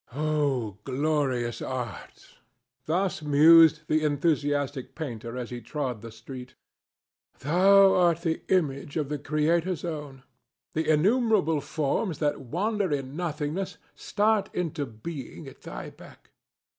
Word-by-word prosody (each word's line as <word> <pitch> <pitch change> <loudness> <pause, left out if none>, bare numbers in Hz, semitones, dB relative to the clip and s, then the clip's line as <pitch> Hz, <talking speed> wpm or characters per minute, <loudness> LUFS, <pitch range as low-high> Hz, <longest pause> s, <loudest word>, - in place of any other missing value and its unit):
"O 140 -9 -1
glorious 135 -4 -1
Art!" 125 -3 -7 0.5
Thus 180 +2 0
mused 160 +2 +6
the 155 0 +1
enthusiastic 145 -3 0
painter 120 -6 -6
as 125 -1 -5
he 120 -1 -6
trod 125 -2 -4
the 115 0 -9
street. 130 +2 -10 0.8
"Thou 195 +6 +5
art 170 -2 +3
the 165 -2 -1
image 145 -6 0
of 150 -3 -1
the 150 -1 -3
Creator's 160 +4 0
own. 150 -5 -6 0.5
The 160 0 -1
innumerable 190 - +2
forms 155 +6 -1
that 145 -2 -1
wander 190 - -1
in 135 -1 -3
nothingness 165 +2 -3 0.2
start 210 0 0
into 155 -5 -2
being 125 +5 -8
at - - -13
thy - - -8
beck. - - -17
150 Hz, 120 wpm, -27 LUFS, 135-170 Hz, 0.8 s, mused